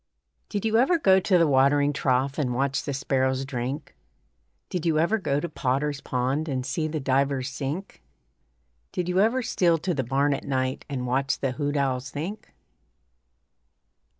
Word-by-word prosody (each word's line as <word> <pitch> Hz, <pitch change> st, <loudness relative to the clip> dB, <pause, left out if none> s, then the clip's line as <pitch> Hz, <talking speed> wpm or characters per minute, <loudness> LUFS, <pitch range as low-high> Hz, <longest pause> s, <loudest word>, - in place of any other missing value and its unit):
Did 205 Hz, 0 st, -3 dB
you 220 Hz, 0 st, +3 dB
ever 295 Hz, +8 st, +4 dB
go 190 Hz, -11 st, +5 dB
to 185 Hz, 0 st, +3 dB
the 170 Hz, -, +4 dB
watering 145 Hz, +1 st, +3 dB
trough 135 Hz, +1 st, 0 dB
And 125 Hz, -4 st, 0 dB
watch 135 Hz, +1 st, 0 dB
the 145 Hz, -, -2 dB
sparrows 130 Hz, -1 st, 0 dB
drink? 130 Hz, +1 st, -4 dB, 0.7 s
Did 180 Hz, -3 st, -3 dB
you 165 Hz, -2 st, +2 dB
ever 175 Hz, +8 st, +2 dB
go 140 Hz, -7 st, 0 dB
to 175 Hz, -, -3 dB
Potter's 140 Hz, 0 st, -1 dB
pond 130 Hz, +5 st, -1 dB
And 130 Hz, -2 st, -2 dB
see 155 Hz, +4 st, -1 dB
the 155 Hz, 0 st, -3 dB
divers 135 Hz, 0 st, +1 dB
sink? 145 Hz, +8 st, -5 dB, 0.9 s
Did 180 Hz, -, -2 dB
you 180 Hz, +1 st, +1 dB
ever 235 Hz, +5 st, +3 dB
steal 175 Hz, -6 st, +2 dB
to 180 Hz, +3 st, -2 dB
the 135 Hz, -4 st, -1 dB
barn 140 Hz, +4 st, +1 dB
at -, -, -4 dB
night 130 Hz, -1 st, -2 dB
And 130 Hz, -3 st, -3 dB
watch 135 Hz, +2 st, 0 dB
the 135 Hz, -, -1 dB
hoot 145 Hz, +2 st, -2 dB
owls 130 Hz, -2 st, -1 dB
think? 165 Hz, +11 st, -6 dB
140 Hz, 170 wpm, -26 LUFS, 130-165 Hz, 0.9 s, go